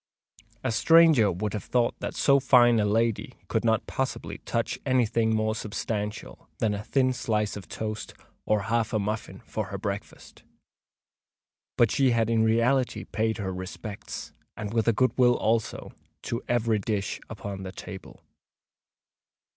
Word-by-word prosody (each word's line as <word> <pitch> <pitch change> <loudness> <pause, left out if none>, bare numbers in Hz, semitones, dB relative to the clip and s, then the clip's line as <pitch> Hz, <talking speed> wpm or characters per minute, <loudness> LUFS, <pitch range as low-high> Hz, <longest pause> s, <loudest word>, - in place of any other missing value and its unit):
A - - 0
stranger 160 -5 +6
would 95 +4 -3
have 105 -4 -4
thought 120 -1 +1
that - - -4
so 140 -1 +4
fine 120 -3 +5
a 105 - +2
lady 115 +2 0
could - - 0
not 110 -2 +2
possibly 130 0 -3
touch - - -2
any 130 -2 +3
thing 110 0 +1
more 110 0 +1
substantial 105 -1 -5
than 110 -2 +1
a 100 0 -4
thin 130 +2 +2
slice 110 -3 -1
of 100 -5 -8
toast 110 -1 -5 0.3
or 105 -1 +1
half 115 0 0
a - - +3
muffin 105 +1 -4
for - - -3
her - - -5
breakfast; - - -6 1.4
but 115 -3 +4
she 135 -2 +3
had 115 -1 +2
in 115 -1 +3
reality 120 +4 +2
paid 110 0 -1
her 95 -3 -3
respects—and 100 +2 -7
with 115 -1 +1
a 115 - +5
good 130 +4 +2
will 120 -1 +6
also—to 115 +1 -3
every 115 -3 +1
dish 100 -1 -2
upon 100 -1 -6
the 95 -1 -6
table. 95 0 -10
110 Hz, 150 wpm, -27 LUFS, 105-120 Hz, 1.4 s, stranger